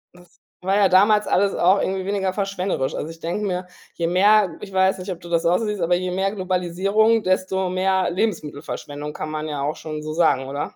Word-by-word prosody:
Das 180 -1 -20 0.2
war 190 +2 0
ja 200 -2 +4
damals 210 +3 +5
alles 200 +1 +2
auch 185 +3 +4
irgendwie 190 0 -2
weniger 195 -2 -1
verschwenderisch. 195 -8 -2
Also, 155 - -4
ich 165 0 -11
denke 175 +6 -3
mir, 180 0 -2 0.3
je 170 - -2
mehr- 195 0 +4
ich 195 - -8
weiß 190 0 +2
nicht, 185 +1 -5
ob 175 - -6
du 175 - -12
das 170 -1 +1
auch 175 +2 +4
so 225 - -2
siehst- 210 -3 -3
aber 175 +1 +2
je 180 0 -2
mehr 190 +2 0
Globalisierung, 195 +4 +1
desto 185 0 0
mehr 190 0 +1
Lebensmittelverschwendung, 150 -6 -4
kann 155 - -5
man 155 0 -4
ja 145 -2 -4
auch 150 +2 -1
schon 155 -1 -6
so 155 0 -4
sagen, 155 -5 +2
oder? 140 +1 -5
185 Hz, 220 wpm, -22 LUFS, 165-195 Hz, 0.3 s, damals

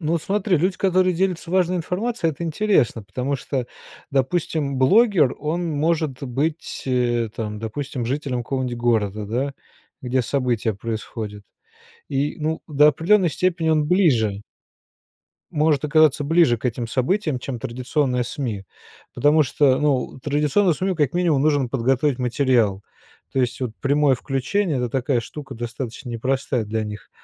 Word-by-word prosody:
Ну 165 +1 0
смотри, 195 +2 0
люди, 185 +4 0
которые 185 -1 +2
делятся 180 -2 -1
важной 185 -1 +2
информацией,- 180 +1 -1
это 170 - -6
интересно, 160 - +1
потому 130 +7 -3
что, 130 -1 -3 0.4
допустим, 140 +1 0
блогер, 180 - +4
он 165 +3 -2
может 155 -2 -1
быть, 140 +5 -3
э, 120 -3 +1
там, 105 -2 -4
допустим, 120 +3 -4
жителем 130 -2 -2
какого-нибудь 130 -1 -3
города, 110 -3 0
да, 130 +6 -2 0.5
где 130 0 0
события 120 -5 0
происходят. 110 -1 -5 0.7
И, 140 +2 -1
ну, 155 +1 -2
до 150 0 +5
определенной 175 +4 +3
степени 170 +1 0
он 155 -1 +2
ближе 120 - +2 1.1
может 150 -1 +1
оказаться 155 -1 +4
ближе 160 -5 +4
к - - -21
этим 120 -1 -2
событиям, 145 - 0
чем 125 -2 -5
традиционное 125 +2 -1
СМИ. 115 -7 -4 0.5
Потому 150 +2 +4
что, 135 -1 +2
ну, 140 -4 0
традиционному 150 +6 +2
СМИ, 185 +3 -1
как 145 -4 +1
минимум, 170 -6 +2
нужно 145 -4 +2
подготовить 130 +2 +1
материал. 120 -6 +1 0.5
То 135 - +1
есть, 125 0 -1
вот, 125 -3 -2
прямое 140 0 +3
включение- 140 +7 -1
это 125 -1 -1
такая 130 -1 0
штука 135 +4 -9
достаточно 120 +1 -6
непростая 130 0 -1
для 110 +1 -2
них. 105 0 -8
140 Hz, 140 wpm, -22 LUFS, 120-160 Hz, 1.1 s, до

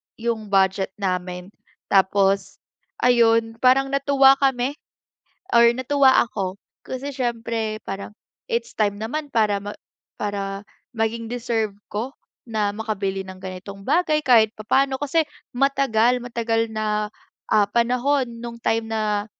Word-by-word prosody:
'yong 225 -2 -3
budget 190 -1 +1
namin. 180 -1 -3 0.4
Tapos 195 0 +2 0.5
ayon, 230 -2 +3
parang 270 +2 +4
natuwa 275 -1 +5
kami 270 +1 0 0.7
or 235 0 +6
natuwa 265 +1 +3 0.2
ako, 195 -2 -4 0.3
kasi 260 +2 -5
syempre 230 -4 -2
parang, 195 +1 -6 0.3
it's 470 -1 -3
time 205 -2 +2
naman 295 +7 -3
para 210 -3 +2
ma 205 - -5 0.5
para 200 -1 -3 0.3
maging 225 +1 -1
deserve 230 -4 -1 0.2
ko 235 +6 -3 0.3
na 215 -3 0
makabili 195 -3 -3
ng 190 0 -11
ganitong 190 +1 -8
bagay 310 - +2
kahit 230 -6 +4
papaano. 265 +5 +1
Kasi 310 +3 +1 0.3
matagal, 250 -3 +2
matagal 230 -2 -1
na, 215 -1 -1 0.4
ah, 210 -1 +5
panahon 250 +3 +1 0.2
nung 235 0 -7
time 225 0 +1
na 210 -2 0
225 Hz, 120 wpm, -23 LUFS, 205-255 Hz, 0.7 s, or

